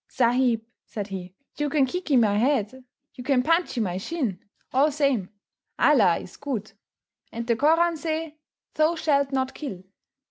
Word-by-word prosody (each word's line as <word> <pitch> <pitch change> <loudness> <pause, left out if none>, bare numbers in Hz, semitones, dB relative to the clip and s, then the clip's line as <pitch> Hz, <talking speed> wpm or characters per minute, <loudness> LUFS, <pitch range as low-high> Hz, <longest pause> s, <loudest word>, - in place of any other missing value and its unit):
"Sahib," 245 -2 +2 0.2
said 205 -2 -6
he, 185 -1 -7 0.2
"you 295 0 0
can 280 -2 +3
kickee 305 -1 0
my 215 -4 +3
head, 255 +1 0 0.3
you 250 - -9
can 255 -1 +2
punchee 330 -3 +1
my 185 -5 -1
shin 230 - -3 0.3
all 280 +4 +4
same. 275 -10 0 0.5
Allah 215 - +4
is 180 - -10
good, 235 -8 -4 0.6
and 230 0 -5
the 235 -1 +2
Koran 330 +5 +3
say, 315 -1 -4 0.3
'Thou 310 +2 +2
shalt 280 -4 +1
not 265 -1 -1
kill. 215 - -7
260 Hz, 150 wpm, -25 LUFS, 220-300 Hz, 0.6 s, all